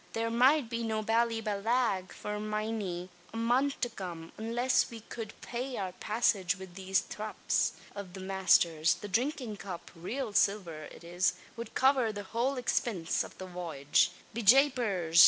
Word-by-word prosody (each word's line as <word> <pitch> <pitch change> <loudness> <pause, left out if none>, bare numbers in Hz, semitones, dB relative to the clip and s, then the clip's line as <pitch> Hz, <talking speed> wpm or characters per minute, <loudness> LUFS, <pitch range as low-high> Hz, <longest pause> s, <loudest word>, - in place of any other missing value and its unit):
Thare 230 0 -1
might 255 +3 +5
be 230 +1 -3
no 220 -1 -1
Ballyballagh 225 -2 +1
for 210 0 -5
miny 215 -4 -3 0.2
a 225 - -6
month 250 +5 +2
to 240 - +1
come; 175 -6 -7
unliss 240 +3 +1
we 230 -2 -9
cowld 220 0 -7
pay 250 +1 -4
our 190 -2 -2
passage 200 -2 +1
wid 190 -2 -10
these 190 +1 +1
thraps 215 0 -1 0.2
av 200 -3 -7
the 190 - -7
masther's. 185 -4 +3
The 205 - -8
drinkin' 240 +1 -1
cup 185 -3 -7
raal 220 +7 -4
silver 180 -8 +1
it - - -12
is 175 +2 +1 0.2
wud 230 -2 -7
cover 260 -4 +4
the 205 -1 -6
whole 235 +7 0
expinse 225 -8 0
av - - -11
the 185 - -6
voyage. 170 -6 +1 0.2
Be 235 - -2
japers! 215 - +4
215 Hz, 155 wpm, -31 LUFS, 185-235 Hz, 0.2 s, might